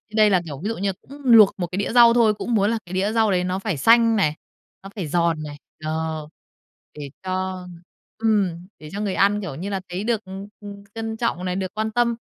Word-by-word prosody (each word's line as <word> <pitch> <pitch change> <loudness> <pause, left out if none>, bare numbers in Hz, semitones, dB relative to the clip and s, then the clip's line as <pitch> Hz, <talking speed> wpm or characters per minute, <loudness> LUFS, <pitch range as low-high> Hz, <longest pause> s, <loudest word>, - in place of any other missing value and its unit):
Đây 215 -1 +5
là, 185 -3 +3
kiểu, 140 -3 -7
ví 210 - -1
dụ 230 - -3
như 195 0 -1
cũng 285 +2 -13
luộc 225 -5 +7
một 175 - -1
cái 185 - -3
đĩa 200 - -1
rau 235 -1 +7
thôi. 225 -3 +4
Cũng 235 +3 -4
muốn 205 +2 +2
là 230 - -1
cái 175 - -10
đĩa 195 +3 0
rau 220 -3 +3
đấy 180 -1 +1
nó 185 +1 -2
phải 195 -7 -2
xanh 230 - +5
này, 155 -7 +1 0.5
nó 195 - -9
phải 180 -7 -4
giòn 165 -1 0
này, 145 -1 -8 0.3
ờ, 155 -1 -3 0.7
để 140 -2 -7
cho 185 -1 -3 0.5
ừm, 195 -6 0
để 150 0 -11
cho 205 - -4
người 200 -3 -1
ăn, 205 +1 +3
kiểu 180 -9 -5
như 185 +7 -5
là, 195 -1 -2
thấy 185 +4 -4
được, 225 -3 -1
ừm, 190 +1 -8
ừm, 200 -1 -10
trân 225 0 -4
trọng 220 -6 -2
này, 180 0 -2
được 190 0 -4
quan 220 0 -2
tâm. 235 -1 +1
195 Hz, 240 wpm, -22 LUFS, 180-220 Hz, 0.7 s, luộc